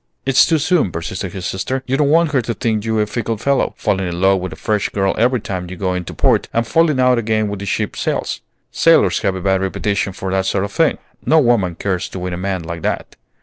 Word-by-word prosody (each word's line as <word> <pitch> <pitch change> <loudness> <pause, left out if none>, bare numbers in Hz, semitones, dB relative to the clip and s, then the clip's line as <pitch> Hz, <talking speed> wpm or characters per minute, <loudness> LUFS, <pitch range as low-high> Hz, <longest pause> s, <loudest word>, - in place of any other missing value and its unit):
"It's 135 -1 +5
too 165 - +3
soon," 155 - +1
persisted 90 +3 -5
his 95 -2 -6
sister. 130 +9 -2
"You 130 - 0
don't 140 0 +2
want 165 0 +3
her 135 -4 +2
to 115 0 -4
think 110 -2 -1
you 110 -1 0
a - - +2
fickle 115 +1 -3
fellow, 140 +5 0
falling 95 -1 0
in 85 0 -4
love 95 +1 +3
with 90 -1 -5
a - - -7
fresh 105 +5 -1
girl 95 -1 0
every 125 +2 +2
time 90 -4 -5
you 95 - -6
go 95 0 -1
into 90 -1 -4
port, - - +2
and 115 0 0
falling 155 +1 +2
out 125 -1 +4
again 110 -1 0
when 100 -1 -5
the 100 - -6
ship - - -1
sails. - - -2 0.3
Sailors - - +4
have 95 - 0
a 95 - -5
bad 95 0 +1
reputation 100 +1 -1
for 95 0 -5
that 95 0 0
sort 95 0 0
of 100 - -7
thing. 165 +7 +2 0.3
No 160 - +3
woman 120 - +3
cares 95 +1 -2
to - - -7
win 90 0 -4
a - - -3
man 95 -1 -2
like 85 0 -6
that." - - -3
100 Hz, 250 wpm, -18 LUFS, 95-125 Hz, 0.3 s, It's